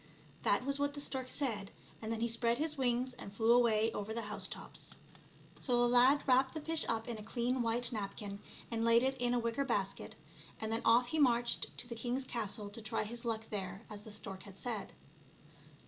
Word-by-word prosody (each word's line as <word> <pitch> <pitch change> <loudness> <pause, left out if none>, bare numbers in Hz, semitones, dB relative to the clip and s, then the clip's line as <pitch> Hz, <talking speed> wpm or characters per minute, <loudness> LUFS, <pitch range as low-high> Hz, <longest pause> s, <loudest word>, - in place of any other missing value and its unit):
That - - +2
was 280 0 0
what 285 0 0
the - - -5
stork 265 -2 -2
said, 220 -10 -1 0.3
and 220 0 -3
then 225 0 -2
he 235 - +2
spread 235 +1 +1
his 310 +1 -1
wings 255 -1 +1
and 200 - -9
flew 225 +3 +3
away 225 -2 +4
over 220 +1 -4
the 230 - -2
house 210 0 -3
tops. - - -7 0.6
So 245 -3 +2
the 240 - +5
lad 250 +4 +6
wrapped 260 +2 +4
the - - -1
fish 320 +1 -2
up 225 -1 -1
in 235 -2 -3
a - - -8
clean 245 +3 0
white 235 +1 0
napkin 200 -2 -4 0.3
and 225 -1 0
laid 230 +1 +5
it 265 +1 +1
in 245 0 +2
a - - +3
wicker 235 +3 0
basket, 200 -7 -2 0.4
and 220 0 -3
then 225 - +1
off 240 +2 +5
he 315 - 0
marched 240 -3 +2
to 240 - -3
the 240 - -5
king 240 +2 -2
s 265 - -1
castle 210 -4 -1
to 230 - -7
try 215 0 -1
his 235 +3 -5
luck 225 -1 -2
there, 190 0 -4
as 205 -1 -7
the 215 - -11
stork 190 -2 -6
had 195 -2 -11
said. 225 -3 -4
235 Hz, 220 wpm, -35 LUFS, 220-250 Hz, 0.6 s, lad